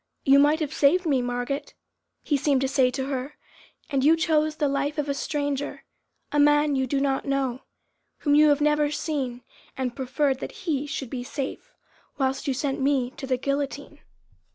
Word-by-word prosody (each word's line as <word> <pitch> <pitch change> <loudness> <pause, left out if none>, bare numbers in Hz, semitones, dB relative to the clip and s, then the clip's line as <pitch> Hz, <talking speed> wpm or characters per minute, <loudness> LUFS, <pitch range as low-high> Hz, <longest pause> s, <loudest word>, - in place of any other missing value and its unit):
"You 275 +1 +6
might 295 +2 +4
have 305 -1 -2
saved 345 +6 +3
me, 275 -5 +2
Margot!" 245 +3 -2 0.6
he 295 - +1
seemed 280 -1 +2
to 270 - +1
say 265 -1 +3
to 265 +1 -3
her, 270 +1 -4 0.5
"and 275 -3 0
you 310 +3 +6
chose 310 -2 +1
the 295 - +1
life 280 +2 -1
of 295 -1 -1
a 280 - 0
stranger, 285 0 -3 0.5
a 295 - +1
man 295 0 +4
you 265 -1 0
do 275 +2 0
not 275 -1 0
know, 270 -2 -1 0.6
whom 290 - +2
you 300 +1 +6
have 290 0 +3
never 300 0 +3
seen, 290 -5 -3 0.3
and 255 -2 -2
preferred 265 +1 0
that 390 +5 -8
he 295 -4 -1
should 270 -4 -5
be 250 -2 -4
safe, 265 +2 -5 0.5
whilst 270 +1 -1
you 270 - +1
sent 275 +1 -2
me 265 -2 +1
to 270 0 -8
the 255 -1 +1
guillotine!" 280 +1 -3
280 Hz, 185 wpm, -25 LUFS, 265-295 Hz, 0.6 s, You